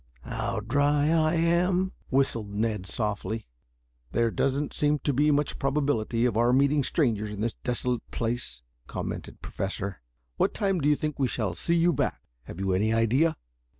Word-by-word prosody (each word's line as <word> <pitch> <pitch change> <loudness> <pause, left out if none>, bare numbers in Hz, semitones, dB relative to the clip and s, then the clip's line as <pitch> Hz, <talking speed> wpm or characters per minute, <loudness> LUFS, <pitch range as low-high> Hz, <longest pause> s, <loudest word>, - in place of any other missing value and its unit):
"Oh, - - -9
how 115 -1 -2
dry 145 +5 +2
I 160 0 +3
am," 180 +3 +2 0.2
whistled 125 -6 +1
Ned 105 -2 -2
softly. 110 +1 -2 0.7
"There 115 -1 +2
doesn't 140 +4 0
seem 150 0 +2
to 145 0 -1
be 145 +4 +3
much 145 0 +1
probability 135 -5 +1
of 120 -4 +1
our 120 +2 +3
meeting 140 +2 +3
strangers 115 -8 +1
in 105 0 -6
this 115 0 0
desolate 125 -1 -2
place," 115 - -3 0.2
commented - - -5
the - - -31
Professor. 95 -4 -4 0.4
"What - - +1
time 195 -4 +1
do 145 - +3
you 150 - +5
think 150 -1 -3
we 135 - +3
shall 110 -7 -2
see 170 - 0
you 170 +1 +4
back? - - -1 0.3
Have 85 - -9
you 95 -1 0
any 105 +4 +2
idea?" 120 +9 +2
125 Hz, 175 wpm, -27 LUFS, 110-150 Hz, 0.7 s, you